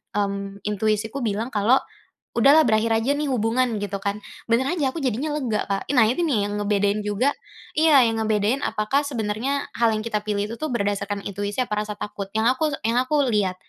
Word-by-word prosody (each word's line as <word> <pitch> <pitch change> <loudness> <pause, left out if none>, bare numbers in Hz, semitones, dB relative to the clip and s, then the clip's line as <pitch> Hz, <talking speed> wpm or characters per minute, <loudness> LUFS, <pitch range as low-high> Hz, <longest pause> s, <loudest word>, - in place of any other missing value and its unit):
mmm, 200 0 -3
intuisiku 215 +4 -1
bilang 225 0 -2
kalau, 215 +4 +3 0.6
"Udahlah 280 +7 +6
berakhir 220 +1 +2
aja, 225 +5 +1
nih, 295 0 -2
hubungan." 235 +1 +1
Gitu, 200 -1 -4
kan. 200 +1 -2 0.3
Bener 235 +2 +3
aja 290 -7 0
aku - - -2
jadinya 260 +5 -1
lega 235 -8 -1
Kak. 195 -1 -2
Nah, 225 - +6
ini, 255 +10 0
nih, 280 -10 +1
yang 205 - -4
ngebedain 205 0 +1
juga 210 +7 +1 0.4
iya, 305 -4 +6
yang 225 -1 0
ngebedain 215 +4 +1
apakah 215 +6 0
sebenarnya 245 +3 -2
hal 230 -1 +3
yang 215 - -2
kita 215 -2 -1
pilih 205 -1 -1
itu, - - -4
tuh, 310 - -2
berdasarkan 200 -2 -2
intuisi 205 +3 -4
apa 210 -3 -2
rasa 210 -1 -5
takut. 200 -1 -5
Yang 220 +1 +2
aku - - 0 0.2
yang 230 - +1
aku 260 +4 -1 0.2
lihat, 195 -3 +1
220 Hz, 195 wpm, -23 LUFS, 205-255 Hz, 0.6 s, Udahlah